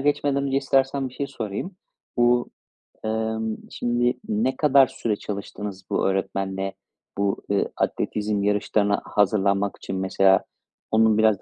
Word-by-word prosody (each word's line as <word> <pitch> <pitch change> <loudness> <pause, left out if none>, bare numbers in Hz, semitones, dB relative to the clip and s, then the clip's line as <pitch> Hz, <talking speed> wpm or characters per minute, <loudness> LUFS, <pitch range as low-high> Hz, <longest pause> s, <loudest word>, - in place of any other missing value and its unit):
geçmeden 140 0 +1
önce 135 0 0
istersen 135 0 +1
bir 125 - -16
şey 140 - -2
sorayım. 130 - -5 0.4
Bu, 120 0 +3 0.5
emm, 110 0 -1 0.2
şimdi 120 +1 0
ne 110 +5 +1
kadar 140 -3 +5
süre 110 -3 -2
çalıştınız 100 -1 -6
bu - - +1
öğretmenle 95 0 -2 0.4
bu, 100 -1 0
ııı, 100 - +1
atletizm 105 -1 -1
yarışlarına 105 0 +1
hazırlanmak 100 -1 +1
için 95 - -5
mesela 95 0 +3 0.5
onun 110 -1 +4
biraz 110 -3 +3
110 Hz, 125 wpm, -24 LUFS, 100-125 Hz, 0.5 s, kadar